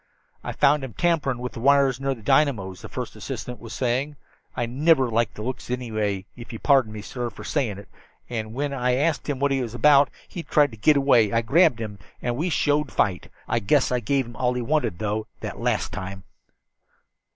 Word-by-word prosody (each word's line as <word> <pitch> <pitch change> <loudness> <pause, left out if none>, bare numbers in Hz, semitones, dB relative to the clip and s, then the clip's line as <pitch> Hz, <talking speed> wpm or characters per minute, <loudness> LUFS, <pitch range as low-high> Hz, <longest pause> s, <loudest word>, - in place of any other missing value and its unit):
"I - - -4
found 145 0 +3
him 130 -4 -6
tamperin' 155 -6 +1
with 125 0 -5
the - - -7
wires 135 0 +4
near 135 0 -1
the 115 - -15
dynamos," 110 -9 +1
the - - -9
first - - -6
assistant 125 -1 -6
engineer - - -19
was 115 - -8
saying. 130 +4 -1 0.4
"I 120 - 0
niver 135 +1 +2
liked 115 -1 0
his 105 - -5
looks 125 -1 -5
annyway, 110 -6 -2
if 120 0 -10
ye'll 115 - -7
pardon 135 -6 +4
me, 105 -1 -7
sir, 120 +1 -4
fer 110 - -11
sayin' 120 -10 -1
it. 100 -2 -11 0.4
And 110 -2 -4
whin 140 +1 -2
I 125 -2 +1
asked 150 +2 0
him 145 - -1
what 140 0 +1
he 135 -1 +1
was 120 -1 -5
about, 145 +1 +5 0.2
he 175 - -6
thried 145 -4 +2
to 110 - -11
git 145 +8 +4
away. 125 -7 +4
I 115 0 +1
grabbed 135 0 +4
him, 105 -3 -6 0.2
and 120 +5 -2
he 180 - 0
showed 150 -2 +1
fight. 95 -4 0 0.2
I - - +1
guess 135 +7 +2
I 125 - +1
give 135 +3 0
'im 120 -1 -11
all 125 +1 0
he 125 - -1
wanted, 145 - 0
though, 105 +1 -2
that - - -6
last - - 0
time." 95 -1 -6
125 Hz, 220 wpm, -24 LUFS, 110-140 Hz, 0.4 s, about